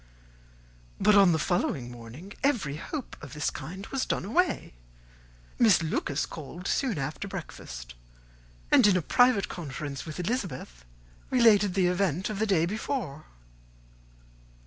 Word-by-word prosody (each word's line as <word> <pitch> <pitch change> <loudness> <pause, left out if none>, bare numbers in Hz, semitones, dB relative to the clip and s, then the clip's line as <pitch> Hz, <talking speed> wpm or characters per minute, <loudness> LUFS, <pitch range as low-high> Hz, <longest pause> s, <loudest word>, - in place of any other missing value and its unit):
But 210 +1 +5
on 200 -3 +7
the 160 - +2
following 150 -7 -1
morning 120 +11 -10
every 205 - +1
hope 275 - -6
of 150 - -9
this 150 -1 -1
kind 180 +8 -7
was 270 -1 0
done - - -1
away. 340 - 0 0.9
Miss 215 -8 +5
Lucas 150 -2 -1
called 165 +4 -8
soon 255 - 0
after 150 +8 -3
breakfast, 60 - -8 0.8
and - - +7
in 190 -3 +4
a 175 - -1
private 245 - +4
conference 145 -4 -6
with 155 +2 -6
Elizabeth 175 - -3 0.5
related 210 -6 +5
the 190 -2 +3
event 180 +1 0
of 205 - -4
the 220 - +1
day 175 -5 +3
before. 190 - -3
180 Hz, 135 wpm, -28 LUFS, 150-210 Hz, 0.9 s, on